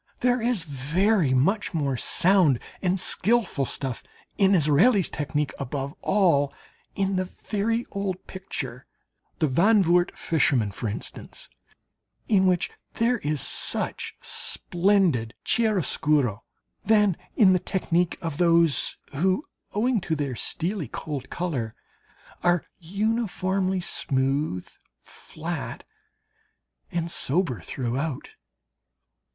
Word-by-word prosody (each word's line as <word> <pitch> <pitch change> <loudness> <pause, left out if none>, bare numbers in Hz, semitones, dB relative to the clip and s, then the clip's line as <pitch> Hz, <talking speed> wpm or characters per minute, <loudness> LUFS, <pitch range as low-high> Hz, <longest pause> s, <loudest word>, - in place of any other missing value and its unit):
There 250 0 +2
is 230 -6 0
very 160 - +1
much 190 +9 +1
more 140 -4 0
sound 175 +1 +3 0.2
and 185 0 +1
skilful 195 - +1
stuff 130 -1 -4 0.3
in 195 0 +4
Israel's 175 - +4
technique 150 0 -2
above 140 +1 -4
all 170 -8 +3 0.4
in 195 -1 0
the 185 - 0
very 225 +5 -2
old 195 -2 -3
picture 135 -10 -6 0.5
"The 155 - +2
Zandvoort 175 - +3
Fisherman," 130 -9 +1
for 110 +3 -4
instance, 105 - -7 0.8
in 190 -3 +4
which 180 -2 +1 0.2
there 235 +1 +1
is 150 -5 -1
such - - -1
splendid 175 - +1
chiaroscuro, 155 - +1 0.4
than 210 -4 +4 0.2
in 195 -5 +6
the 180 - +3
technique 175 -1 0
of 165 -3 -4
those 170 -5 +4 0.2
who, 185 - +1 0.3
owing 230 +1 +1
to 160 -2 -1
their 140 -3 -2
steely 170 - -1
cold 140 +1 -6
colour, 135 -11 -3 0.7
are 175 -1 +2
uniformly 190 -1 -1
smooth, 135 - -1 0.3
flat, - - -7 1.1
and 170 0 -2
sober 145 - 0
throughout. 130 - -3
175 Hz, 105 wpm, -25 LUFS, 140-195 Hz, 1.1 s, in